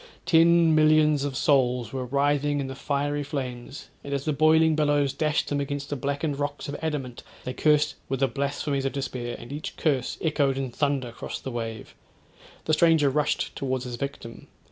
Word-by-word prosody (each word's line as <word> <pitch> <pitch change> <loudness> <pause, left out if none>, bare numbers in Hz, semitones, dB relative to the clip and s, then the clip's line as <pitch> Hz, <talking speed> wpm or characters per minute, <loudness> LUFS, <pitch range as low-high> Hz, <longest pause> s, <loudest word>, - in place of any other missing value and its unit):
Ten 165 0 +5
millions 155 -2 +4
of 135 -2 -3
souls 125 -5 +2
were 130 -1 -3
writhing 145 +2 +1
in 140 - -2
the 135 - -5
fiery 145 +2 -1
flames, 135 -2 -6
and 140 0 -3
as 140 - -3
the 155 - +1
boiling 160 +1 +4
billows 145 -2 +2
dashed 150 -1 0
them 145 - 0
against 140 0 -4
the - - 0
blackened 140 +2 -2
rocks 145 0 -3
of 145 - -4
adamant, 145 -6 -3 0.2
they 125 - -4
cursed 150 +1 +2 0.2
with 135 - -1
the 135 - +4
blasphemies 140 +2 -2
of 135 - -1
despair; 125 -3 -4
and 120 - -9
each 150 - -6
curse 140 -6 0
echoed 145 -4 +1
in 135 -2 -3
thunder 135 -2 -1
cross - - -6
the 130 - -6
wave. 115 -2 -5 0.7
The 155 - +1
stranger 155 -3 +4
rushed 150 +2 -1
towards 130 -2 -2
his 120 -1 -5
victim. 120 -3 -7
140 Hz, 185 wpm, -26 LUFS, 130-150 Hz, 0.7 s, Ten